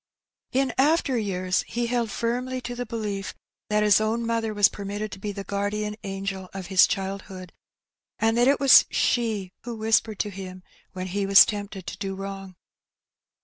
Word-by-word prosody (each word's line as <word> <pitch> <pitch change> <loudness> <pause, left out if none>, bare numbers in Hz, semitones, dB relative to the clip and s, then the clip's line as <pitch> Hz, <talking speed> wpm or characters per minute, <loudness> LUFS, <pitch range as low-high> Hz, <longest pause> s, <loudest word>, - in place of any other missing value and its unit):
In 265 -2 +1
after 290 -1 +3
years 185 -4 0
he 240 +1 -2
held 235 -1 -1
firmly 250 +3 -2
to 245 - -5
the 245 0 -5
belief 210 -4 -4 0.3
that 210 0 +2
his 210 0 +5
own 225 +2 -1
mother 230 -1 -1
was 205 -2 +5
permitted 205 +1 -5
to 190 - -8
be 205 +1 -4
the 200 0 -6
guardian 210 +1 -2
angel 195 -1 -5
of 190 -1 -5
his 185 - +7
child 195 0 -3
hood, 185 -2 -10 0.6
and 225 0 +1
that 240 +1 +4
it 280 - +3
was 275 -2 +8
she 220 -6 0
who 235 0 -5
whispered 220 -1 +1
to 210 - -2
him 185 -1 -9 0.3
when 185 0 -5
he 195 +2 -2
was 195 0 +9
tempted 205 -3 -5
to - - -7
do 195 -1 -3
wrong. 195 -1 -7
205 Hz, 180 wpm, -25 LUFS, 195-230 Hz, 0.6 s, was